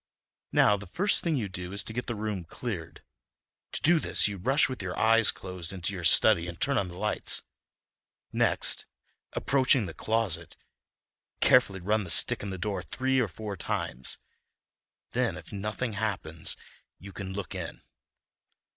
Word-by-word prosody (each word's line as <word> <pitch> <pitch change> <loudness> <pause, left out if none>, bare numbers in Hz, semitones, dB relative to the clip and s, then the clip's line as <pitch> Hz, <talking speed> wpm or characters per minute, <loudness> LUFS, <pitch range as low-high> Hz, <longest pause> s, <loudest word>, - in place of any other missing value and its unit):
Now, 105 - +5
the 100 0 -9
first 190 - +1
thing 165 -4 0
to 110 -5 -1
do 90 -1 -6
is 100 - -1
to 110 - -7
get 125 +2 -4
the 120 - -2
room 105 -3 -3
cleared—to 80 - -9
do 170 +1 +5
this - - +2
you 100 -1 -4
rush 135 +10 +4
with 130 -4 -5
your 95 -1 -4
eyes 115 0 +5
closed 90 -3 -4
into 95 +1 0
your 90 -2 -5
study 85 +1 +6
and 85 0 -7
turn 140 -1 +3
on 100 - -1
the 90 0 -9
lights—next, 105 +2 -2 0.5
approaching 130 -3 +3
the 80 - -6
closet, 100 -8 -1 0.8
carefully 100 -7 +4
run 105 +3 +1
the 90 - -8
stick - - +3
in 100 - -4
the 95 - -4
door 95 0 -2
three 130 +7 0
or 120 - +2
four 100 +3 -6
times. 65 -7 -3 0.9
Then, - - 0
if - - -11
nothing 110 +4 -3
happens, 95 -7 -2 0.4
you 100 +1 -11
can 95 -1 -6
look 100 -4 -5
in. - - -6
100 Hz, 160 wpm, -29 LUFS, 90-115 Hz, 0.9 s, study